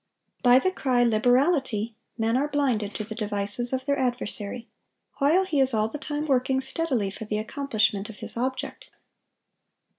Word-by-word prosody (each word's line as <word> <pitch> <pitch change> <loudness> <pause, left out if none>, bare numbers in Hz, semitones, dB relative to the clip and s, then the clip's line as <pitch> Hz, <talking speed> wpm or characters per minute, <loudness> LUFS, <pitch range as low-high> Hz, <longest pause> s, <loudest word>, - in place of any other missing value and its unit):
By 245 0 +6
the 370 +8 +2
cry, 255 -8 +1
Liberality, 240 -1 +2 0.2
men 225 0 +1
are 275 +3 +1
blinded 255 -9 -1
to 215 - -3
the 220 +1 -7
devices 210 +2 -1
of 260 0 -2
their 280 0 0
adversary, 240 -2 -2 0.5
while 320 +7 +3
he 315 -6 0
is 265 -3 +6
all 215 0 +1
the 295 - -6
time 295 0 -3
working 265 -2 +1
steadily 265 -7 -1
for 220 - -8
the 210 0 -2
accomplishment 215 -4 -1
of 220 - -9
his - - -7
object. 260 - -4
250 Hz, 160 wpm, -26 LUFS, 215-275 Hz, 0.5 s, By